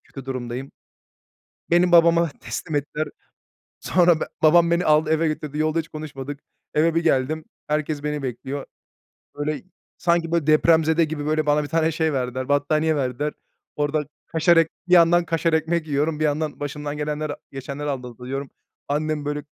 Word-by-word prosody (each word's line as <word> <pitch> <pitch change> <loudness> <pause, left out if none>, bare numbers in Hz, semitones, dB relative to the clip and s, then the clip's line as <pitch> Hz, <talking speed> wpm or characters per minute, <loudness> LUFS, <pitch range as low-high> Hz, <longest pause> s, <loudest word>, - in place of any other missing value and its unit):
Kötü 135 -2 -10
durumdayım." 130 0 -5 1.0
Beni 175 +1 +4
babama 170 -1 +5
teslim 160 -4 -5
ettiler. 150 +2 -2 0.7
Sonra 175 -3 +3
be - - 0 0.2
babam 170 +2 +5
beni 170 +1 +2
aldı 155 0 +4
eve 160 +1 +2
götürdü, 150 -1 -4
yolda 155 +1 +1
hiç 160 - -4
konuşmadık. 145 -3 -7 0.3
Eve 160 +2 +2
bir 165 - +2
geldim, 155 +1 +1 0.2
herkes 150 -1 -1
beni 150 -1 -2
bekliyor. 135 +2 -4 0.7
Böyle, 150 +1 -2 0.4
sanki 170 -1 +1
böyle, 170 -4 +1
depremzede 160 +1 +4
gibi, 150 -2 -4
böyle, 155 0 +1
bana 150 0 +3
bir 145 - -5
tane 160 0 +1
şey 160 0 0
verdiler, 130 -1 -2
battaniye 155 +2 +2
verdiler. 140 +2 -1 0.4
Orada 150 +1 0 0.2
kaşar 165 +1 +3
ekm 165 -1 +4 0.2
bir - - -2
yandan 170 0 +6
kaşar 165 0 0
ekmek 160 +1 +1
yiyorum, 150 +1 0
bir - - +1
yandan 150 0 -1
başımdan 145 0 -4
gelenleri, 150 0 -2 0.2
geçenleri 140 +2 -4
anlatıyorum. 130 +1 -5 0.4
Annem 150 0 -1
böyle, 145 0 -3
155 Hz, 155 wpm, -23 LUFS, 145-160 Hz, 1.0 s, yandan